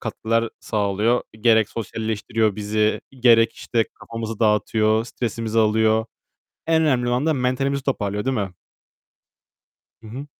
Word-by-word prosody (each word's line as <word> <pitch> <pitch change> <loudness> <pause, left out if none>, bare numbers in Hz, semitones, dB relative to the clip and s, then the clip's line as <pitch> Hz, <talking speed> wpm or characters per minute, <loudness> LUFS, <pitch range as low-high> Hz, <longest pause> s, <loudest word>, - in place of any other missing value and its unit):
katkılar 115 +1 -1
sağlıyor. 105 +3 0 0.2
Gerek 110 -2 +4
sosyalleştiriyor 110 -1 -2
bizi. 105 +1 0 0.2
Gerek, 115 -2 +5
işte, 115 -2 -1
kafamızı 115 -1 -6
dağıtıyor. 110 0 +2
Stresimizi 115 -2 -3
alıyor. 110 0 +3 0.6
En 160 0 +3
önemli 125 -6 +1
olan 125 +4 0
da 160 - +2
mentalimizi 135 +1 -1
toparlıyor, 105 -6 -2
değil 130 0 0
mi? 100 -2 -2 1.5
Hı 110 - -12
hı. 130 +6 -7
115 Hz, 120 wpm, -22 LUFS, 110-125 Hz, 1.5 s, Gerek